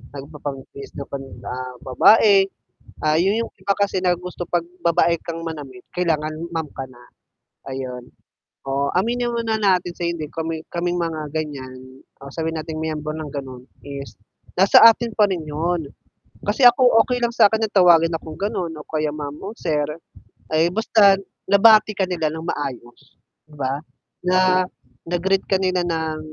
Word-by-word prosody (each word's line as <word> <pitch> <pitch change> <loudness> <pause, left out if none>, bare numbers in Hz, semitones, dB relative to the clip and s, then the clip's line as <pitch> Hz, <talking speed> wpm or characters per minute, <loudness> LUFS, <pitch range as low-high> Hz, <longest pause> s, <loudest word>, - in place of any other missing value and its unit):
nagpapangbihis 140 -1 -8
na 140 - -6
pan 135 -1 -6 0.2
ah, 125 0 -5
babae, 195 - +5 0.6
ah, 155 0 +3
'yon 195 +6 +2
yung - - -13
iba 200 +1 0
kasi 200 -2 +1
na 180 -1 +3
gusto 180 0 -7
'pag 175 -1 0 0.2
babae 170 0 +3
kang 165 0 -5
manamit, 160 +1 -7
kailangan 155 -3 0 0.2
ma'am 160 -2 -2
ka 135 - -6
na, 120 -1 -17 0.7
ayun. 125 -2 -6 0.6
Oo, 140 +1 0
aminin 240 +6 0
mo 235 - -1
na 225 -1 -1
natin 185 -4 +1
sa 175 - -3
hindi, 170 -3 -3
kami 160 0 -4
kaming 175 +1 -1
mga 155 -3 -4
ganyan, 130 -4 -6 0.2
o 140 - -9
sabihin 160 0 -3
nating 160 0 -6
miyembro 155 -1 -3
ng 155 -2 -6
gano'n 130 -3 -7 0.2
is, 140 -1 -8 0.4
nasa 190 +2 +6
atin 230 0 +5
pa 210 - +6
rin 180 -3 -2
'yon, 160 0 -2 0.6
kasi 230 +5 +2
ako 245 +1 +7 0.2
okay 250 -1 -2
lang 235 - +2
sa'kin 220 -1 +4
na 220 - 0
tawagin 175 -4 +5
akong 160 -1 -10
gano'n 195 -5 -2
o 150 -1 -10
kaya 155 -1 -1
ma'am 145 -1 -6
o 205 - -5
sir, 150 -8 -1 0.7
ay 160 +2 +3
basta 200 0 +4 0.3
nabati 215 +1 +6
ka 190 - +2
nila 170 -4 -1
ng 160 0 -6
maayos, 130 -5 -5 0.5
'di 150 - -16
ba? 135 +1 -2 0.4
Na 185 0 +3 0.4
na-greet 190 +2 +1
ka 190 - +3
nila 185 -1 +1
ng, 160 -2 -2
165 Hz, 165 wpm, -21 LUFS, 150-190 Hz, 0.7 s, ako